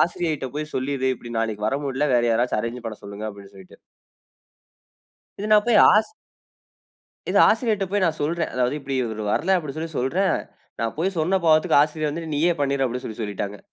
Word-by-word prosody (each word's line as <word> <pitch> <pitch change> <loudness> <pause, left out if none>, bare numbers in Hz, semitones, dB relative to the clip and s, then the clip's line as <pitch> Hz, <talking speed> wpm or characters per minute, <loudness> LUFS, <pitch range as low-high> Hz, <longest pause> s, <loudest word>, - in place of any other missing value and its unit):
ஆசிரியைட்ட 160 -5 0
போய் 150 0 -5
சொல்லிரு. 130 0 -1
இப்டி 120 0 -10
நாளைக்கு 110 -2 -2
வர 135 - 0
முடில. 140 +2 0
வேற 120 - +3
யாராச்சு 120 0 +1
அரேஞ்சு 115 +2 -4
நான் 120 - -9
பண்ண 110 - -9
சொல்லுங்க 100 +2 -6
அப்டின்னு 100 -1 -14
சொல்லிட்டு. 95 -1 -15 1.6
இது 210 - -3
நான் 210 -1 +6
போய் 230 -3 +5
ஆஸ் 215 +1 +3 1.2
இத - - 0
ஆசிரியர்ட 215 -6 +1
போய் 205 -1 +1
நான் 160 -3 0
சொல்றேன். 160 +2 -1
அதாவது 125 +1 +1
இப்டி 135 0 -5
இவரு 110 -2 -5
வர்ல 185 - +2
அப்டி 150 -5 -6
சொல்லி 165 +1 -4
சொல்றேன், 180 +10 +1 0.4
நா - - 0
போய் 185 +3 -1
சொன்ன 180 +5 +2
பாவத்துக்கு 155 -2 +4
ஆசிரியர் 155 0 -1
வந்து 165 0 -5
நீயே 165 +4 +3
பண்ணிரு 140 -1 +1
அப்டி 125 +1 -4
சொல்லி 110 0 -7
சொல்லிட்டாங்க. 100 -1 -4
140 Hz, 185 wpm, -23 LUFS, 115-165 Hz, 1.6 s, நான்